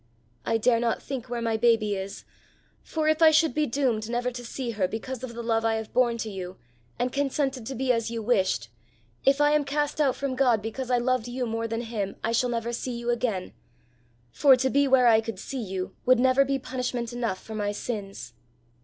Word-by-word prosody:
I 225 - +2
dare 230 +1 +3
not 235 -1 0
think 260 -3 -6
where 240 -1 -3
my 225 -1 0
baby 220 -3 +3
is, 195 0 -6 0.6
for 315 -1 -2
if 310 +1 +2
I 320 - +9
should 315 -2 +3
be 305 +2 +1
doomed 235 -4 0
never 245 +1 -1
to 245 0 -7
see 240 +1 -4
her 200 -4 0
because 245 +5 -6
of 235 -2 -6
the 235 - -5
love 225 -1 +1
I 225 0 +2
have 220 -1 -5
borne 240 -2 +3
to 220 -1 -4
you 185 -1 -7 0.4
and 250 +1 -1
consented 275 -3 -1
to 270 - -4
be 260 +1 +1
as 230 -2 0
you 230 -1 -4
wished 190 - +1 0.6
if 275 +1 +4
I 295 0 +4
am 300 -1 +3
cast 295 +1 -1
out 270 -4 +2
from 275 -1 -2
God 255 -4 +3
because 225 +4 -5
I 250 - +3
loved 245 -1 0
you 250 +1 -3
more 230 0 -2
than 225 +1 -3
him 215 -4 -4
I 225 - 0
shall 245 +2 +2
never 235 0 -2
see 240 0 -3
you 240 0 -1
again 225 -6 -2 0.8
for 275 - +6
to 260 +1 0
be 280 0 +3
where 260 -2 +5
I 225 -2 +6
could 225 -3 -6
see 260 +6 -5
you 190 -3 -5
would 255 0 +5
never 260 +2 +4
be 275 0 0
punishment 250 -2 -3
enough 235 -6 -2
for 220 - -10
my 205 -1 -1
sins." 200 - -6
240 Hz, 225 wpm, -26 LUFS, 225-260 Hz, 0.8 s, I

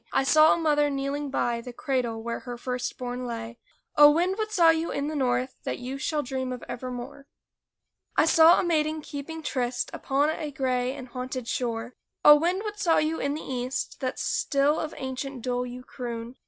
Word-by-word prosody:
I - - +2
saw 310 +3 +6
a - - +3
mother 295 -3 +2
kneeling 280 +1 -2
by 240 -3 0
The 250 - -8
cradle 240 -4 -2
where 235 0 -3
her 245 -1 -7
first 250 0 -3
born 250 0 -4
lay. 230 0 -6 0.4
O, 295 0 +9
wind! 350 +5 +2
what 430 0 -2
saw 340 -5 +6
you 325 +1 -1
in 285 +1 -2
the 310 - -4
North 255 -1 0
That - - -3
you 260 +2 -6
shall 295 +1 -1
dream 260 0 -3
of 250 -1 -6
evermore? 255 +3 -7 0.9
I - - +6
saw 325 +2 +7
a - - +1
maiden 310 -2 0
keeping 300 +3 -7
tryst 245 -3 -2
Upon 285 +3 +1
a 310 -1 -4
gray 255 -2 -1
and 260 -3 -9
haunted 255 -1 -5
shore. 235 0 -2 0.3
O, 295 - +11
wind! 350 +6 0
what 420 -1 -5
saw 335 -4 +3
you 310 +1 +1
in 280 +1 -1
the 310 - -6
East 255 0 -3
That 255 -1 -3
still 285 +2 +1
of 310 - -4
ancient 260 -1 -5
dole 250 0 -1
you 250 +1 -8
croon? 240 -1 -6
270 Hz, 195 wpm, -27 LUFS, 250-305 Hz, 0.9 s, O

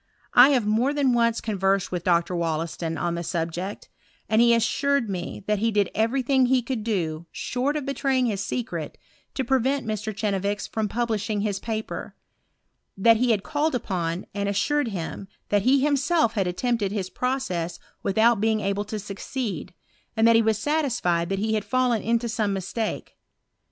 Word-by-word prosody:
1 250 +3 +8
have 245 -5 +2
more 235 +7 +1
than 275 -4 +2
once 230 -1 +2
conversed 195 -3 0
with 180 -2 -3
Dr. 175 +1 +2
Wollaston 165 0 -2
on 175 -1 -1
the 170 - -3
subject, 175 +3 -4 0.4
and 220 +1 +3
he 235 0 +6
assured 245 +3 +2
me 180 0 -5
that 210 0 +1
he 225 +2 +2
did 205 -3 +1
every 230 +5 +1
thing 265 0 +3
that - - -1
he 255 -2 +3
could 240 -2 -3
do, 170 -7 -2
short 260 +4 -2
of 290 - -4
betraying 270 -2 +1
his 205 -4 -1
secret, 245 +4 -4 0.4
to 265 - 0
prevent 265 +2 +1
Mr. 215 0 -3
Chenevix 205 -1 -1
from 220 -2 -2
publishing 220 -3 -1
his 205 -2 -1
paper; 220 0 -5 0.8
that 225 +3 +5
he 250 +2 +1
had 210 -4 +2
called 310 -1 0
upon, 180 -6 -2
and 200 0 -1
assured 285 +8 +1
him, 195 -1 -5 0.2
that 205 -1 +3
he 260 +5 +4
himself 285 -2 +2
had 195 -5 0
attempted 205 +2 -1
his 190 -3 -3
process 185 -10 -2 0.2
without 220 +2 +3
being 220 0 +2
able 200 0 -1
to 215 - -4
succeed, 210 +3 -5 0.5
and 225 +1 +5
that 230 - +6
he 225 - +6
was 220 -1 +2
satisfied 220 - 0
that 195 - -1
he 220 +2 0
had 215 -2 0
fallen 250 -3 +1
into 235 +1 0
some 220 -3 0
mistake. 195 +4 -4
220 Hz, 175 wpm, -25 LUFS, 195-245 Hz, 0.8 s, 1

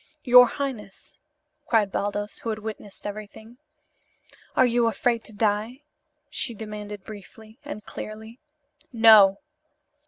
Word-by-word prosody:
"Your 250 -1 +8
highness!" 245 -8 -7 0.5
cried 215 -4 +2
Baldos, 205 +1 -3
who 230 - -5
had 215 - -2
witnessed 215 -2 -9
everything. 215 +3 -9 1.0
"Are 260 - +5
you 240 -1 +2
afraid 230 0 0
to - - -9
die?" 215 +5 -1 0.4
she 235 - -3
demanded 210 -2 -8
briefly; 215 +3 -13
and 290 -8 -8
clearly. 220 +3 -9 0.5
"No!" 220 -5 +7
220 Hz, 115 wpm, -25 LUFS, 210-235 Hz, 1.0 s, Your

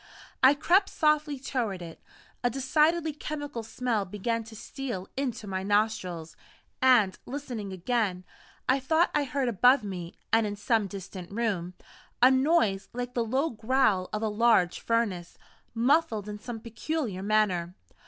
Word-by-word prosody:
I 265 +2 +7
crept 370 +6 +3
softly 305 -1 +1
toward 245 -7 -2
it. 165 -1 -10 0.4
A 245 - +3
decidedly 305 +5 +2
chemical 290 -4 -5
smell 225 -1 -1
began 210 +4 -2
to 225 0 -12
steal 235 -5 -6
into 245 -5 -3
my 190 -2 -3
nostrils 195 -5 -1 0.5
and, 240 -7 +4
listening 245 -7 -5
again, 190 -1 -1 0.4
I 260 +2 +3
thought 320 +6 +2
I 295 -1 +1
heard 275 -1 -1
above 245 +3 +4
me, 180 -4 -6 0.2
and 225 -1 +4
in 205 - -4
some 215 0 +1
distant 190 -2 -8
room, 200 -5 -2 0.4
a 255 +2 +7
noise 260 - +2
like 245 0 -4
the 240 - 0
low 265 +8 0
growl 220 -5 +1
of 215 +1 -3
a - - +1
large 210 -4 +3
furnace, 205 -7 -1 0.4
muffled 235 -3 +2
in 210 0 -6
some 225 +1 -6
peculiar 230 - -3
manner. 195 -4 +1
230 Hz, 145 wpm, -28 LUFS, 200-265 Hz, 0.5 s, I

